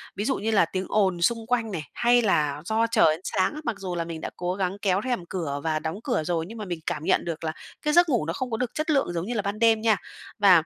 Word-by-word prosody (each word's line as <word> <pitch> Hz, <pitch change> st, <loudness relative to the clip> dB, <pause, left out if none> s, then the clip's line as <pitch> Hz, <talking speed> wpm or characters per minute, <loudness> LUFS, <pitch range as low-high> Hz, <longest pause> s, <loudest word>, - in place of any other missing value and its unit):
ví 205 Hz, -, -2 dB
dụ 270 Hz, +2 st, +1 dB
như 220 Hz, +2 st, -2 dB
là 200 Hz, -5 st, +5 dB
tiếng 185 Hz, +3 st, -3 dB
ồn 190 Hz, -5 st, +2 dB
xung 225 Hz, +4 st, +1 dB
quanh 230 Hz, -3 st, 0 dB
này, 160 Hz, -5 st, -3 dB
hay 240 Hz, 0 st, +4 dB
là 150 Hz, -8 st, +1 dB
do 225 Hz, +2 st, +1 dB
trời 165 Hz, -9 st, +4 dB
sáng 190 Hz, 0 st, 0 dB
á, 305 Hz, -, -6 dB
mặc 235 Hz, -, -1 dB
dù 185 Hz, -3 st, -4 dB
là 170 Hz, -, -1 dB
mình 165 Hz, -1 st, -6 dB
đã -, -, -3 dB
cố 180 Hz, 0 st, -2 dB
gắng 190 Hz, 0 st, -1 dB
kéo 195 Hz, 0 st, +2 dB
rèm 245 Hz, -9 st, -1 dB
cửa 160 Hz, -6 st, -3 dB
và 155 Hz, -1 st, 0 dB
đóng 160 Hz, +6 st, -4 dB
cửa 240 Hz, -, 0 dB
rồi, 165 Hz, 0 st, -1 dB
nhưng 225 Hz, +4 st, -9 dB
mà 210 Hz, -, -5 dB
mình 175 Hz, -3 st, -4 dB
cảm 160 Hz, -3 st, -2 dB
nhận -, -, +2 dB
được 165 Hz, -1 st, -4 dB
là 155 Hz, -, -1 dB, 0.3 s
cái 300 Hz, 0 st, 0 dB
giấc 345 Hz, -1 st, +6 dB
ngủ 240 Hz, -, +1 dB
nó 165 Hz, -, -2 dB
không 255 Hz, -2 st, -4 dB
có 225 Hz, -, 0 dB
được 250 Hz, 0 st, -2 dB
chất 305 Hz, +2 st, -2 dB
lượng 275 Hz, -, +2 dB
giống 170 Hz, 0 st, -2 dB
như 240 Hz, -, -3 dB
là 215 Hz, -, 0 dB
ban 200 Hz, +2 st, -3 dB
đêm 225 Hz, -1 st, +4 dB
nha, 220 Hz, -2 st, +3 dB, 0.4 s
và 185 Hz, -5 st, +7 dB
195 Hz, 295 wpm, -26 LUFS, 170-230 Hz, 0.4 s, và